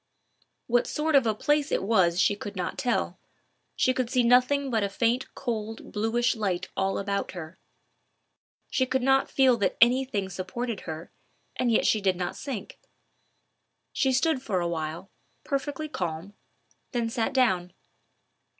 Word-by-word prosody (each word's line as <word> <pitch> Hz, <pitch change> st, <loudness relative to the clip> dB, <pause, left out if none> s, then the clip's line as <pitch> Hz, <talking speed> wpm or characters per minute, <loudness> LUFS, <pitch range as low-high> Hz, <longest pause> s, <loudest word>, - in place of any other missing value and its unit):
What 240 Hz, 0 st, +2 dB
sort 310 Hz, +1 st, -1 dB
of 270 Hz, -4 st, +5 dB
a 215 Hz, -, +1 dB
place 295 Hz, +5 st, +1 dB
it -, -, +1 dB
was 185 Hz, -5 st, +3 dB
she 205 Hz, -, +3 dB
could 205 Hz, 0 st, -7 dB
not 180 Hz, -1 st, -3 dB
tell. 250 Hz, -3 st, -1 dB, 0.6 s
She 255 Hz, -, +2 dB
could 255 Hz, -2 st, -1 dB
see 250 Hz, -1 st, +2 dB
nothing 255 Hz, +3 st, +3 dB
but 225 Hz, -2 st, +2 dB
a 200 Hz, -, 0 dB
faint 230 Hz, +5 st, 0 dB
cold 225 Hz, -3 st, -4 dB
bluish 230 Hz, +4 st, +1 dB
light 195 Hz, -5 st, -2 dB
all 195 Hz, 0 st, 0 dB
about 200 Hz, -1 st, -2 dB
her. 170 Hz, -1 st, -8 dB, 1.1 s
She 260 Hz, -, +1 dB
could 260 Hz, 0 st, 0 dB
not 270 Hz, +1 st, +3 dB
feel 260 Hz, -3 st, +4 dB
that 200 Hz, -, 0 dB
any 250 Hz, +3 st, +5 dB
thing 200 Hz, -7 st, -3 dB
supported 195 Hz, +5 st, -4 dB
her, 160 Hz, +1 st, -7 dB, 0.4 s
and 245 Hz, -2 st, +1 dB
yet 225 Hz, -, +3 dB
she 215 Hz, -, +3 dB
did 190 Hz, -2 st, +2 dB
not 175 Hz, 0 st, -3 dB
sink. 265 Hz, -8 st, -6 dB, 1.1 s
She 265 Hz, -, +2 dB
stood 265 Hz, +1 st, +2 dB
for 200 Hz, -8 st, -1 dB
a 175 Hz, -, -1 dB
while, 165 Hz, +2 st, -4 dB, 0.3 s
perfectly 290 Hz, +2 st, -3 dB
calm, 175 Hz, -, -4 dB, 0.6 s
then 235 Hz, -2 st, 0 dB
sat 230 Hz, +2 st, -1 dB
down. 190 Hz, -10 st, +2 dB
230 Hz, 160 wpm, -27 LUFS, 190-260 Hz, 1.1 s, of